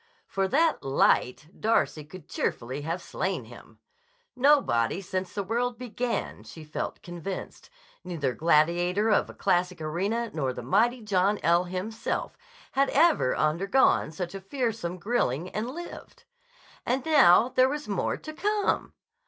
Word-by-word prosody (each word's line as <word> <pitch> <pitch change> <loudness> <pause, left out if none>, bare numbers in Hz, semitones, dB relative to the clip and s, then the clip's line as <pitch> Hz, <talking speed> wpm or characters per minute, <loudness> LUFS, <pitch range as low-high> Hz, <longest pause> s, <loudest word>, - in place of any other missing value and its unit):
For 195 -1 -1
that 315 +8 +2
"light" 135 0 +2
Darcy 215 -8 +1
could 160 +2 -12
cheerfully 130 +4 -3
have 165 +4 -4
slain - - -3
him. - - -14 0.6
Nobody 245 - +3
since 185 -1 -4
the 200 - -3
world 235 +4 -1
began, 245 0 -3
she 160 - -11
felt 150 - -5
convinced, 175 +2 -7 0.3
neither 160 -8 -2
gladiator 175 - +2
of - - +3
the - - -11
classic 180 0 0
arena 200 +9 -2
nor 135 -5 -1
the 125 - -7
mighty 230 - +2
John 200 0 +2
L. 170 +2 +3
himself, 185 +5 -4 0.4
had 275 +1 +2
ever 305 - +3
undergone 170 +6 +2
such 175 +3 -5
a 195 - -6
fearsome 220 -5 -3
grilling 180 - -1
and 220 +3 -3
lived. 345 +6 -9 0.6
And 255 +2 -1
now 265 - +6
there 255 0 +3
was 295 +1 -4
more 200 -3 -1
to 310 - -9
come. 415 +4 0
195 Hz, 140 wpm, -27 LUFS, 170-245 Hz, 0.6 s, now